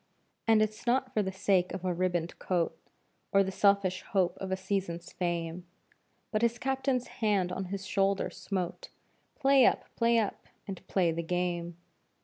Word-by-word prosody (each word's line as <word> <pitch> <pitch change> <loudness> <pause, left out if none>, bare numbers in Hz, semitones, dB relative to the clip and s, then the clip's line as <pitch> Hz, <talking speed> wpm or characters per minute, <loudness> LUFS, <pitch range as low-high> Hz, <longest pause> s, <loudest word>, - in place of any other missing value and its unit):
And 220 -1 +6
it's 215 +2 -4
not 255 +1 +2
for 215 - +2
the 190 -1 -2
sake 190 -1 +1
of 190 -1 -6
a 180 - +1
ribboned 175 -1 -1
coat 175 -3 0 0.6
Or 195 -1 +5
the 190 - -3
selfish 200 -2 +3
hope 190 -5 +1
of 190 -1 -4
a 190 - +1
season's 185 -3 -3
fame, 175 0 -3 0.6
But 215 - +1
his 235 0 +2
Captain's 265 0 0
hand 200 -5 0
on 190 +1 -3
his 190 +1 -5
shoulder 195 0 +1
smote; 185 -3 -4 0.5
"Play 270 -1 +5
up! - - +4
Play 235 0 +3
up! 215 -3 -1 0.2
And 195 -2 -6
play 180 -4 +2
the 165 +1 -2
game!" 175 0 -2
190 Hz, 165 wpm, -30 LUFS, 180-215 Hz, 0.6 s, And